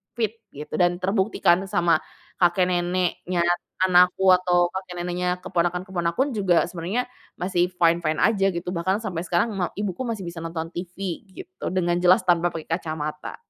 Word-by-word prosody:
fit 225 -1 -2 0.2
gitu, 150 +2 -8
dan 175 0 +2
terbukti 195 +2 0
kan 185 +3 +4
sama 175 -5 +2 0.4
kakek 175 +1 +4
neneknya 175 0 0 0.4
anakku 185 +1 +5
atau 175 -1 +2
kakek 180 -2 -5
neneknya 180 0 -1
keponakan-keponakan 180 +8 -1
juga 195 -6 +2
sebenarnya 185 +9 -3 0.2
masih 180 -1 0
fine-fine 170 -2 +2
aja 200 -3 +3
gitu 175 +1 -4
bahkan 190 +5 -1
sampai 180 -6 -3
sekarang 180 +7 +1
ma 185 -4 -1
ibuku 200 -1 -3
masih 220 -5 -3
bisa 170 -1 -6
nonton 165 0 -5
TV 180 +2 -6
gitu 185 0 -9
dengan 175 -1 +1
jelas 180 +1 +5
tanpa 175 -1 +3
pakai 160 0 -7
kacamata. 155 -2 -4
180 Hz, 150 wpm, -24 LUFS, 170-190 Hz, 0.4 s, anakku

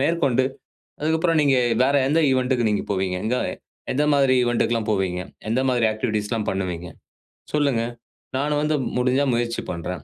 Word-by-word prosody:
மேற்கொண்டு, 140 -4 +2 0.6
அதுக்கப்புறம் 160 +2 +1
நீங்க 140 -2 +3 0.3
வேற 140 +2 +2
எந்த 155 +4 +2
ஈவன்ட்க்கு 130 -2 +1
நீங்க 105 - 0
போவீங்க, 95 -2 -1
எங்க 125 +3 +1 0.6
எந்த 145 +3 +1
மாதிரி 135 -2 +4
ஈவன்ட்க்குலாம் 120 -2 0
போவீங்க, 95 -3 0 0.3
எந்த 120 +4 +1
மாதிரி 120 -3 +2
ஆக்டிவிட்டீஸ்லாம் 110 0 -2
பண்ணுவீங்க, 90 -3 -3 0.7
சொல்லுங்க. 140 -6 +2 0.5
நானும் 145 +2 0
வந்து 155 +1 +1 0.2
முடிஞ்சா 130 +3 +2
முயற்சி 120 0 -1
பண்றேன், 85 -2 -5
125 Hz, 140 wpm, -23 LUFS, 105-140 Hz, 0.7 s, மாதிரி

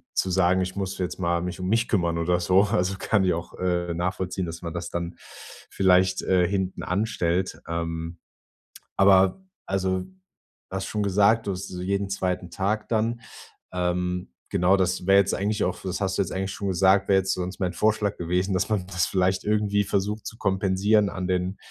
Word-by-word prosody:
zu 95 - +1
sagen: 95 0 +3
„Ich 90 0 -3
muss 95 -1 -3
jetzt 90 -1 -3
mal 85 -1 0
mich 90 +1 -5
um 90 - -2
mich 115 +3 +2
kümmern.“ 85 -5 +1
Oder 90 +1 +1
so. 95 +2 +4
Also, 95 -2 0
kann 105 -3 +2
ich 90 - +3
auch, 85 0 -6
äh, 90 -1 0
nachvollziehen, 90 +1 -2
dass 85 +1 -7
man 85 -1 -5
das 85 0 -4
dann 85 0 -4 0.5
vielleicht, 95 -1 +3
äh, 90 -1 +3
hinten 95 0 -2
anstellt. 90 -2 -1
Ähm, 85 0 -4 0.8
aber 95 - +4 0.2
also, 95 -1 -1 0.7
hast 95 0 -3
schon 105 -1 -2
gesagt, 105 +3 +3
du - - +1
hast 90 +1 -6
so 90 -1 -6
jeden 100 +1 -1
2. 90 -2 -2
Tag 105 +4 -2
dann. 115 +1 0 0.5
Ähm, 90 -2 -1 0.2
genau, 90 +3 +3
das 90 -1 -1
wäre 100 0 +6
jetzt 100 0 +2
eigentlich 105 +2 -1
auch, 90 - 0
f - - -14
das 90 0 -3
hast 95 -1 0
du - - +3
jetzt 95 - -7
eigentlich 95 +1 -2
schon 100 0 -4
gesagt, 95 +1 +3
wäre 95 -1 +5
jetzt 95 0 0
sonst 90 +3 -4
mein 90 -2 -1
Vorschlag 105 +1 +1
gewesen, 90 +3 -1
dass 90 +2 0
man 105 -4 0
das 90 -3 0
vielleicht 95 0 +1
irgendwie 105 -1 +1
versucht 105 +2 -2
zu 115 - -8
kompensieren 100 +1 +2
an 95 -2 -4
den 90 +1 -1
95 Hz, 195 wpm, -25 LUFS, 90-100 Hz, 0.8 s, wäre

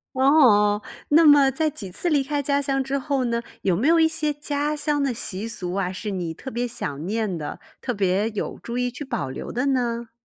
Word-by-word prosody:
哦。 240 -7 +5 0.3
那 320 +3 +6
么 290 -2 +7
在 315 +3 0
几 200 -10 -8
次 345 - -2
离 290 -4 +3
开 290 +1 -1
家 280 0 +1
乡 270 -1 0
之 270 +1 -1
后 275 -1 -1
呢， 235 -1 0 0.2
有 185 -3 +2
没 225 - +1
有 330 +1 +5
一 320 - +6
些 315 -2 -1
家 290 0 -2
乡 295 -1 0
的 270 -3 0
习 215 -2 -5
俗 185 -6 -5
啊， 190 -2 -1
是 190 +3 -5
你 175 -4 -3
特 265 - -8
别 245 +1 -1
想 145 -10 -5
念 210 -2 -1
的， 150 -2 -6 0.2
特 245 - -2
别 200 +1 +1
有 215 -2 -4
注 235 +1 -5
意 250 0 +1
去 250 +4 -7
保 235 - -3
留 130 - -6
的 250 +4 -1
呢？ 235 -3 0
245 Hz, 240 characters per minute, -24 LUFS, 205-285 Hz, 0.3 s, 么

